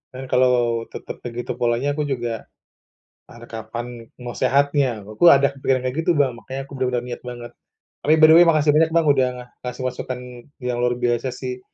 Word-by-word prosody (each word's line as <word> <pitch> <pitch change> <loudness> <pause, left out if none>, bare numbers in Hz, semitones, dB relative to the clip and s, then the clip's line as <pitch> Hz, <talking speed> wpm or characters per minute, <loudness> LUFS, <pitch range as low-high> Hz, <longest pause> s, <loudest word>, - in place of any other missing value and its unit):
kan 130 - -6
kalau 120 -2 +2
tetap - - -9
begitu 120 0 -5
polanya 120 +4 +1
aku 150 +1 -2
juga, 120 -4 -4 0.8
pan 120 0 -14
kapan 115 +1 -6 0.4
mau 120 - -5
sehatnya, 140 -4 +1
aku 110 - +2
ada 140 -4 +6
kepikiran 135 -1 0
kayak 130 0 -2
gitu - - +5
Bang, 140 -3 +3
makannya 135 +2 -6
aku 140 - -17
benar-benar 125 -2 0
niat 125 -1 -7
banget. 120 -1 -8 0.5
Tapi, 150 - +3
by 155 - +9
the - - +8
way, 175 - +8
makasih 155 -2 +4
banyak 160 +1 +4
Bang 165 -1 +4
udah 130 -2 +2 0.4
ngasih 125 +1 -5
masukan 125 0 -5 0.4
yang 125 -1 -1
luar 120 0 +1
biasa 120 0 0
sih. 125 -1 -5
125 Hz, 185 wpm, -22 LUFS, 120-140 Hz, 0.8 s, by